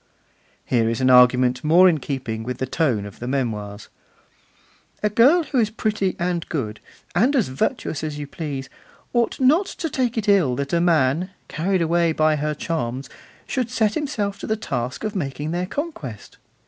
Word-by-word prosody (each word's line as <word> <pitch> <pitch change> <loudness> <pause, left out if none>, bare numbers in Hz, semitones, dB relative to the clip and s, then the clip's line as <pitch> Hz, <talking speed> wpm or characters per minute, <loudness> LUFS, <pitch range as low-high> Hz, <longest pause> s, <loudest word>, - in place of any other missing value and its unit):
Here 115 -3 +2
is 115 - -2
an 130 0 +3
argument 125 0 +5
more 170 +5 +6
in 165 -4 +3
keeping 130 -5 -4
with 125 +2 -4
the 130 - -2
tone 130 -7 0
of 100 +1 -11
the 120 - -5
Memoirs: 110 -6 -3 1.2
A 210 - +2
girl 275 - +5
who 275 -4 -1
is 220 -3 +2
pretty 210 -3 -1
and 175 -1 -2
good, 110 -9 -3 0.3
and 245 - +3
as 235 - +2
virtuous 140 +3 -2
as 155 -1 -3
you 145 - -4
please, 140 -4 -5 0.5
ought 240 -1 +1
not 300 +9 +4
to 325 - -5
take 245 -3 -1
it 215 - -1
ill 180 -11 +4
that 140 +3 -4
a 170 - +3
man, 165 0 +2 0.2
carried 180 +2 0
away 170 0 +2
by 155 0 +3
her 150 +1 -1
charms, 135 -5 -3 0.3
should 250 -3 -2
set 220 -4 +1
himself 210 -9 -2
to - - -6
the 220 - +1
task 125 - -4
of 215 -1 -3
making 145 -2 -3
their 175 +1 -2
conquest. 190 - -6
160 Hz, 180 wpm, -22 LUFS, 130-210 Hz, 1.2 s, more